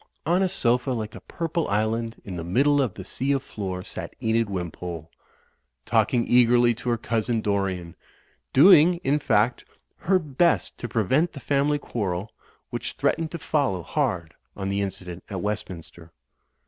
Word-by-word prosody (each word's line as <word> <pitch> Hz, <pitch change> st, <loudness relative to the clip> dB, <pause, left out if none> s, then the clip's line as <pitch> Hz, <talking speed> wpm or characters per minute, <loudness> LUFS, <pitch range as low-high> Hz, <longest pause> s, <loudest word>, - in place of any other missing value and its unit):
On 175 Hz, +4 st, +2 dB
a 190 Hz, -, +2 dB
sofa 125 Hz, -7 st, +1 dB
like 110 Hz, -3 st, -4 dB
a -, -, -9 dB
purple 165 Hz, -1 st, -3 dB
island 110 Hz, +2 st, -1 dB
in 95 Hz, -, -6 dB
the 85 Hz, -, -4 dB
middle 140 Hz, -, +3 dB
of 125 Hz, -8 st, -1 dB
the 95 Hz, -, -7 dB
sea 135 Hz, +8 st, -2 dB
of 135 Hz, -1 st, -1 dB
floor 95 Hz, -6 st, -5 dB
sat -, -, -7 dB
Enid 115 Hz, -1 st, +1 dB
Wimpole, 85 Hz, -3 st, -5 dB, 0.7 s
talking 120 Hz, -2 st, +2 dB
eagerly 120 Hz, 0 st, +5 dB
to 120 Hz, +2 st, -5 dB
her 120 Hz, -, +2 dB
cousin, 115 Hz, +1 st, -1 dB
Dorian; 95 Hz, -5 st, -2 dB, 0.6 s
doing, 175 Hz, +3 st, +7 dB
in 145 Hz, +3 st, +2 dB
fact, 115 Hz, -3 st, +1 dB, 0.3 s
her 190 Hz, +2 st, +2 dB
best 165 Hz, +1 st, +1 dB
to 120 Hz, -, -5 dB
pre 110 Hz, -, +1 dB
vent 150 Hz, -, +2 dB
the 140 Hz, -, -8 dB
family 145 Hz, +2 st, +1 dB
quarrel, 100 Hz, -7 st, -3 dB, 0.4 s
which -, -, -4 dB
threatened 165 Hz, -1 st, 0 dB
to 170 Hz, -, -5 dB
fol 145 Hz, -6 st, 0 dB
low 90 Hz, -2 st, -5 dB
hard 85 Hz, +1 st, -1 dB, 0.2 s
on 95 Hz, -1 st, -3 dB
the 100 Hz, +1 st, 0 dB
incident 90 Hz, -3 st, -5 dB
at 95 Hz, -3 st, -4 dB
Westminster. 90 Hz, -5 st, -6 dB
115 Hz, 165 wpm, -25 LUFS, 95-140 Hz, 0.7 s, doing